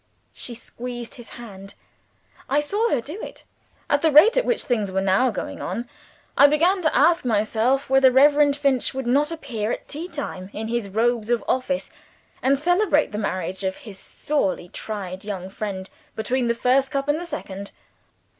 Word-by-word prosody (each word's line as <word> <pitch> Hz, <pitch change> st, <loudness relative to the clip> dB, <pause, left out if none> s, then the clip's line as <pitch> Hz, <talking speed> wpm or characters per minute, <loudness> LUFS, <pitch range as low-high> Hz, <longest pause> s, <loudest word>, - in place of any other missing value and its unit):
She 240 Hz, -, -7 dB
squeezed 240 Hz, 0 st, -7 dB
his 240 Hz, -3 st, -11 dB
hand. 200 Hz, -4 st, -11 dB, 0.7 s
I 285 Hz, -, +3 dB
saw 410 Hz, +10 st, 0 dB
her 265 Hz, -, +1 dB
do 315 Hz, -, -8 dB
it. -, -, -9 dB, 0.4 s
At 285 Hz, -, +2 dB
the 320 Hz, -, +3 dB
rate 310 Hz, -, +7 dB
at -, -, +2 dB
which 485 Hz, -, +1 dB
things 220 Hz, -7 st, -1 dB
were 190 Hz, -, 0 dB
now 195 Hz, +6 st, +3 dB
going -, -, -5 dB
on, 240 Hz, +1 st, -4 dB, 0.5 s
I 285 Hz, -, +8 dB
began 340 Hz, +6 st, +2 dB
to 315 Hz, -, +1 dB
ask 330 Hz, +5 st, +4 dB
myself 230 Hz, +3 st, +1 dB
whether 270 Hz, 0 st, +5 dB
Reverend 285 Hz, +2 st, +5 dB
Finch 275 Hz, -3 st, 0 dB
would 265 Hz, -1 st, -3 dB
not 285 Hz, +6 st, +2 dB
appear 235 Hz, -9 st, -3 dB
at -, -, -5 dB
tea 315 Hz, +4 st, -6 dB
time 195 Hz, -, -6 dB
in 220 Hz, +1 st, -5 dB
his 235 Hz, -3 st, -2 dB
robes 230 Hz, +2 st, 0 dB
of 240 Hz, -1 st, +1 dB
office, 265 Hz, +2 st, -1 dB, 0.5 s
and 275 Hz, +2 st, +3 dB
celebrate 350 Hz, 0 st, +2 dB
the 210 Hz, -, -3 dB
marriage 185 Hz, -2 st, -3 dB
of 190 Hz, 0 st, -2 dB
his 200 Hz, -4 st, -11 dB
"sorely 195 Hz, -12 st, -2 dB
tried" 190 Hz, -3 st, -6 dB
young 190 Hz, -3 st, -5 dB
friend 195 Hz, -2 st, -5 dB, 0.3 s
between 245 Hz, +3 st, -1 dB
the 235 Hz, -, +1 dB
first 265 Hz, +3 st, +2 dB
cup 275 Hz, +1 st, -2 dB
and 295 Hz, +3 st, +1 dB
the -, -, -5 dB
second. 200 Hz, -, -6 dB
250 Hz, 180 wpm, -23 LUFS, 210-290 Hz, 0.7 s, I